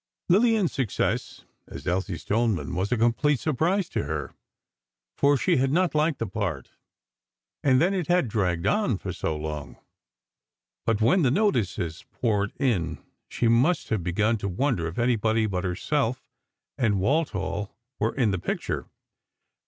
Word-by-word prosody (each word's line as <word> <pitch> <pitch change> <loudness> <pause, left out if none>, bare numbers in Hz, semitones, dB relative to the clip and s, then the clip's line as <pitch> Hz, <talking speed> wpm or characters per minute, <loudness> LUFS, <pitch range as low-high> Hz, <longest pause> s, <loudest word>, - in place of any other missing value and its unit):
Lillian's 215 -1 +3
success 130 -7 -2 0.2
as - - -9
Elsie 90 0 -1
Stoneman 105 - 0
was 95 +5 -1
a 125 - +2
complete 120 +5 +2
surprise 165 +6 +1
to - - -2
her, 75 -1 -4 0.8
for 140 0 +4
she 170 +5 +2
had 135 +1 +2
not 175 0 +2
liked 155 0 +2
the 115 - -2
part, 95 -10 -4 0.9
and 130 -2 +4
then 180 +5 +3
it 180 -5 -1
had 175 -6 +3
dragged 90 -5 0
on 155 - +2 0.2
so 80 -2 -2
long. 75 -1 -5 1.1
But 115 -2 +1
when 130 - +4
the 135 - +4
notices 110 - 0
poured 105 -4 0
in, 90 - 0 0.3
she 120 - 0
must 125 +10 +2
have 110 -5 0
begun 105 +6 +1
to 100 - -3
wonder 95 -3 0
if 85 - -7
anybody 115 -2 +2
but 95 -3 -2
herself 125 +8 -1 0.5
and 105 -6 +2
Walthall 120 - 0 0.3
were 110 +2 0
in 120 -6 +2
the 95 - -1
picture. - - -3
115 Hz, 145 wpm, -26 LUFS, 95-145 Hz, 1.1 s, for